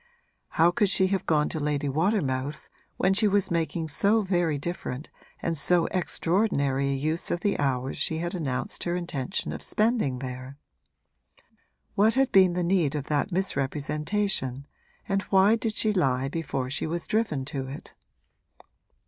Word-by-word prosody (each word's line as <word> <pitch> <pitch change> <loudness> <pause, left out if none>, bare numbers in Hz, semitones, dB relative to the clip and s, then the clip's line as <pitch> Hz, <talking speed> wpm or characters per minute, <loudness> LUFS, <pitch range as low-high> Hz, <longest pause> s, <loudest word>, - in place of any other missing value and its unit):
How 165 +2 +6
could 200 +3 +2
she 190 - +3
have 195 - -2
gone 150 -2 +3
to 160 - -3
Lady 145 -1 -1
Watermouth's 145 -3 -1 0.3
when 190 +1 +3
she 210 +2 +3
was 200 -2 +1
making 165 -1 -1
so 205 +8 +2
very 175 -5 +1
different 145 -3 -5 0.3
and 165 - 0
so 170 +3 +3
extraordinary 165 -7 0
a 140 - 0
use 155 +5 -1
of 175 - -1
the 200 +1 0
hours 135 -2 -1
she 160 - +1
had 175 +2 -3
announced 145 -8 -3
her 175 0 0
intention 170 -2 -3
of - - -6
spending 215 - +1
there? 130 +1 -7 1.4
What 215 +3 +3
had 270 -1 +2
been 185 -2 +6
the 180 0 -1
need 170 -5 +1
of 145 -1 -4
that 150 +6 0
misrepresentation 150 -2 -1 0.4
and 195 0 +1
why 195 +3 +5
did 225 -1 -2
she 215 -1 +2
lie 135 -7 +1
before 135 -5 -3
she 140 - -1
was 170 +1 -3
driven 205 -12 0
to 135 -2 -3
it? 135 - -9
165 Hz, 155 wpm, -27 LUFS, 140-195 Hz, 1.4 s, How